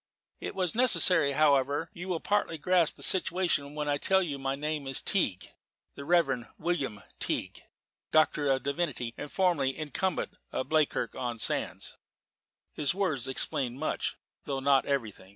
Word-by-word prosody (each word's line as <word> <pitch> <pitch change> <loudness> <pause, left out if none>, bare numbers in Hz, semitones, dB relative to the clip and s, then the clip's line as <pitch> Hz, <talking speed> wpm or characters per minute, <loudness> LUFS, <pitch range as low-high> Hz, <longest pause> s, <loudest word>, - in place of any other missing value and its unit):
"It - - -6
was 185 -3 0
necessary, 185 - +4
however. 145 +1 +2
You 175 +2 -7
will 180 -3 -1
partly 205 -4 0
grasp 175 0 +2
the - - -8
situation 170 -6 +1
when 150 -1 -3
I 145 -1 +1
tell 190 +4 +3
you 145 -5 -4
that - - -12
my 135 0 0
name 150 0 -3
is 135 - +2
Teague 110 - 0 0.4
the 140 - -8
Reverend 140 -7 +2
William 140 -11 -2 0.2
Teague, - - -2 0.5
Doctor 150 -2 +3
of 135 -1 +1
Divinity, 140 -5 -2
and 145 - -7
formerly 160 -9 +1
incumbent 160 +4 -2
of 130 - -3
Bleakirk 155 -6 +1
on 120 -2 -4
Sands." - - -2 0.8
His 150 +3 -1
words 155 -11 -1
explained 130 -1 +2
much, 155 - -2 0.3
though 135 -1 -2
not 135 0 +3
everything. 110 -9 -3
145 Hz, 155 wpm, -29 LUFS, 135-175 Hz, 0.8 s, necessary